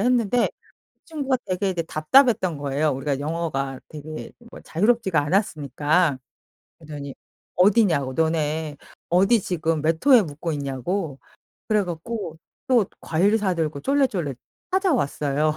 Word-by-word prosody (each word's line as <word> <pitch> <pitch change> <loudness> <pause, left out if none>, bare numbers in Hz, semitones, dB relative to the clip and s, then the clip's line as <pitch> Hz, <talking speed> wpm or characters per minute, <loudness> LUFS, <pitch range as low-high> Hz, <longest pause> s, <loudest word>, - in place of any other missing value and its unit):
했는데 245 0 +2 0.5
이 - - -47
친구가 280 -5 -1
되게 185 +1 0
이제 175 -2 -2
답답했던 185 - +3
거예요. 145 +2 0
우리가 135 0 -2
영어가 145 -4 -3
되게 155 +1 -8 0.2
뭐 - - -11
자유롭지가 200 -2 +1
않았으니까. 150 - +1 0.6
그러더니 145 -3 -8 0.4
어디냐고 180 - +3
너네 160 -1 -1 0.3
어디 195 +6 +4
지금 165 -3 -1
몇 160 +2 +1
호에 260 -5 +8
묵고 155 +1 -4
있냐고 140 +3 -3 0.5
그래 210 -1 +2
갖고 175 0 -5 0.3
또 245 -5 +4 0.2
과일 195 +7 +2
사 195 -4 0
들고 155 -3 -2
쫄래쫄래 235 - +1 0.4
찾아왔어요. 155 - +1
165 Hz, 300 characters per minute, -23 LUFS, 150-205 Hz, 0.6 s, 호에